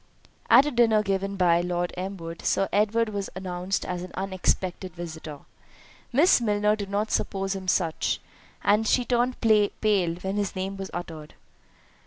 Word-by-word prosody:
At 270 - +8
a 295 - -1
dinner 225 -4 +3
given 195 0 -1
by 175 -2 +4
Lord 175 0 -2
Elmwood, 180 -3 -6
Sir 195 - +1
Edward 220 +2 +2
was 200 -2 -4
announced 185 0 -3
as 180 -1 -3
an 180 - -7
unexpected 185 -1 -2
visitor; 160 -4 -7 0.7
Miss 290 +2 +5
Milner 210 -1 +2
did 200 -2 -6
not 205 +2 -1
suppose 195 -1 -1
him 190 -1 -7
such, 170 -3 0 0.4
and 210 +2 +3
she 250 +2 +2
turned 245 +1 0
pale 215 -3 +4 0.5
when 190 +3 -4
his 205 -2 -2
name 190 +1 -3
was 195 0 -6
uttered. 160 -3 -7
195 Hz, 155 wpm, -26 LUFS, 180-210 Hz, 0.7 s, At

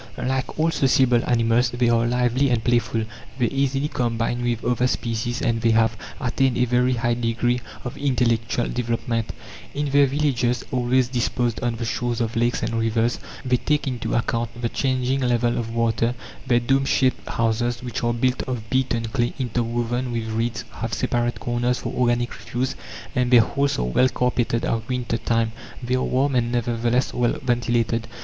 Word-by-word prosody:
Like 130 0 -2
all 165 +1 +3
sociable 130 -4 +3
animals, 120 0 +3
they 120 0 0
are 115 0 +3
lively 125 +3 +2
and 120 -3 +1
playful, 120 -2 +1 0.3
they 125 - +2
easily 135 +1 0
combine 120 -2 -1
with 120 -2 -1
other 125 +1 +2
species, 120 -1 -2
and 115 -1 +1
they 115 - +3
have 115 0 +3 0.2
attained 130 0 +1
a 125 - +3
very 125 +1 +2
high 120 0 +1
degree 120 +1 0 0.2
of 125 - -6
intellectual 120 -3 +1
development. 115 -1 -2 0.4
In 145 0 -1
their 140 0 +5
villages, 130 -3 0
always 125 0 +2
disposed 120 -1 -1
on 120 -1 -1
the 115 +1 -4
shores 120 +1 -1
of 115 -1 -1
lakes 120 +1 +1
and - - -1
rivers, 115 +1 +1 0.3
they 125 -1 +3
take 150 +3 0
into 125 -3 -2
account 115 0 -1
the 120 -1 -1
changing 130 +1 0
level 120 -2 +1
of 115 -1 -3
water; 115 +1 +1 0.3
their 120 -1 +4
domeshaped 135 +1 +1
houses, 115 +1 0
which 120 -1 -4
are 120 - +2
built 125 +2 0
of 115 -4 -5
beaten 130 -3 +1
clay 120 +1 -1
interwoven 120 0 -1
with 115 -1 -3
reeds, 115 +1 -2
have - - -4
separate 120 0 -1
corners 120 +1 0
for 120 - -5
organic 120 -1 +1
refuse, 125 +2 -3 0.4
and 125 -1 +2
their 120 -2 +8
halls 140 +5 0
are - - 0
well 60 - +3
carpeted 120 -2 0
at 115 0 -2
winter 125 -2 -1
time; 115 -1 +1 0.3
they 120 +1 -1
are 130 - +2
warm, 135 +2 +1
and, 120 -2 +1
nevertheless, 120 +1 0
well 120 -1 +1
ventilated. 120 -2 0
120 Hz, 170 wpm, -23 LUFS, 115-125 Hz, 0.4 s, their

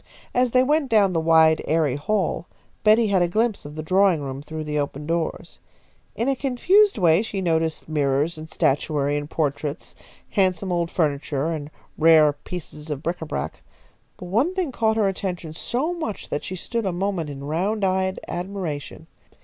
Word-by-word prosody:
As 250 0 +3
they 255 +2 +4
went 295 0 +1
down 205 -5 +4
the 165 - +1
wide, 160 -1 +5
airy 155 -5 +2
hall, 180 +2 -1 0.4
Betty 220 0 +5
had 190 -2 +3
a 175 - +3
glimpse 220 +2 0
of 145 +1 -9
the 155 - -5
drawing 185 0 +3
room 135 -1 -5
through 155 +1 -6
the 150 -1 -2
open 145 0 -3
doors. 165 0 -3 0.6
In 230 - -1
a 275 - +2
confused 360 +11 +3
way 170 -2 +4
she 215 -3 -4
noticed 160 -3 0
mirrors 145 +1 +1
and 155 0 -9
statuary 145 0 +1
and 145 0 -3
portraits, 145 -1 -2 0.4
handsome 185 -2 +1
old 170 -1 0
furniture 150 -2 -1
and 150 -3 -4 0.3
rare 155 -2 +6
pieces 150 0 -8
of 150 0 -4
bric 170 +1 -2
a 160 - -5
brac; 75 - -4 0.6
but - - -9
one 240 - +1
thing 360 -7 -1
caught 220 -2 +1
her 210 -3 +3
attention 180 -4 -4
so 270 - -2 0.4
that 145 - -2
she 185 - -5
stood 230 +4 -2
a - - 0
moment 175 -3 -2
in 140 -1 -7
round 190 +8 -1
eyed 190 0 0
admiration. 175 -5 -5
170 Hz, 175 wpm, -23 LUFS, 150-205 Hz, 0.6 s, rare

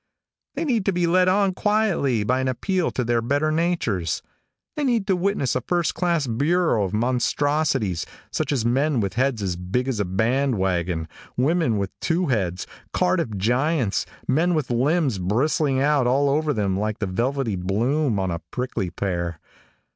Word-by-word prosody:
They - - -2
need 235 -8 +1
to 195 - +3
be 175 -1 +1
led 180 +2 +3
on 195 0 +3
quietly 190 - +1
by 125 +5 +1
an 130 - -1
appeal 180 +8 0
to 125 - -2
their 120 0 +1
better 145 +6 +1
natures. 155 - 0 0.5
They 300 - -2
need 235 -7 +1
to 195 -2 +2
witness 180 - 0
a - - 0
first 175 -2 0
class 170 -5 0
bureau 145 - +1
of 95 - -4
monstrosities, 125 - 0 0.2
such - - -1
as 125 -6 0
men 135 +3 +2
with 100 -4 -1
heads 125 -2 0
as 90 -2 -1
big 95 +9 -2
as 125 -5 -1
a 100 - +1
band 120 +7 +1
wagon, 85 -3 -1 0.3
women 145 -3 +2
with 100 -1 -2
two 175 +2 0
heads, 95 -7 -1 0.3
Cardiff 170 - +1
giants, 125 - +1 0.2
men 170 +5 +2
with 150 -5 -1
limbs 135 - +1
bristling 130 - +1
out 140 -2 +3
all 140 +3 +3
over 155 +1 +1
them 100 -6 0
like 110 0 -2
the 105 - -2
velvety 120 +4 -1
bloom 115 +8 0
on 95 -2 -1
a 85 - -3
prickly 120 -7 -3
pear. 85 -4 -3
130 Hz, 170 wpm, -23 LUFS, 105-160 Hz, 0.5 s, to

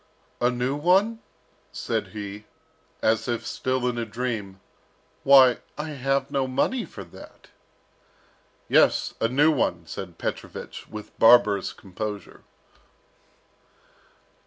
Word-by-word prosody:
"A 120 - +3
new 125 +2 -1
one?" 190 +9 +2 0.5
said - - -3
he, 105 0 -8 0.6
as 110 +1 +2
if 120 -2 -2
still 130 -1 -1
in 120 -1 -1
a - - -1
dream. 110 -4 -4 0.6
"Why, 130 -3 +7 0.2
I 150 +1 -4
have 135 -1 -1
no 135 -1 0
money 215 - 0
for - - -10
that." 85 - -15 1.2
"Yes, - - +3
a 115 - +3
new 145 +6 +4
one," 85 - -1
said 85 0 -8
Petrovich, - - -6
with 105 -1 -9
barbarous 115 -4 +5
composure. 105 +2 -7
120 Hz, 110 wpm, -25 LUFS, 105-135 Hz, 1.2 s, Why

